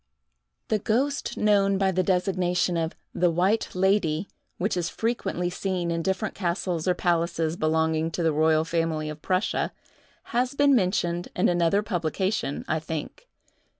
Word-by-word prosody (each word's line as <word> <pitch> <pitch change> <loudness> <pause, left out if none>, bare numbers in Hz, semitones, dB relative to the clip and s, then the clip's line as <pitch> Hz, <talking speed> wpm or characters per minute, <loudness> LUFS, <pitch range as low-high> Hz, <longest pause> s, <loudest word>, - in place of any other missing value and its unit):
The 215 - +2
ghost 270 +8 -1
known 200 -2 +3
by 190 -1 +2
the 185 0 +1
designation 180 -1 +1
of 165 -1 -1 0.2
"the 175 0 +2
White 185 +7 +1
Lady," 190 -2 +1 0.3
which 200 +3 0
is 175 -2 -1
frequently 195 -6 -2
seen 180 -2 -2
in 165 0 -1
different 190 +4 -1
castles 175 -2 -2
or 180 - +3
palaces 170 -2 0
belonging 160 0 +1
to 175 - -1
the 160 -1 +2
royal 155 +1 +3
family 165 -2 -1
of 155 0 -10
Prussia, 185 +4 0 0.6
has 250 +3 +1
been 285 0 +4
mentioned 180 -4 0
in 180 - +3
another 175 +3 +2
publication, 175 -4 -2
I 155 - 0
think. 160 - -6
180 Hz, 150 wpm, -26 LUFS, 165-195 Hz, 0.6 s, been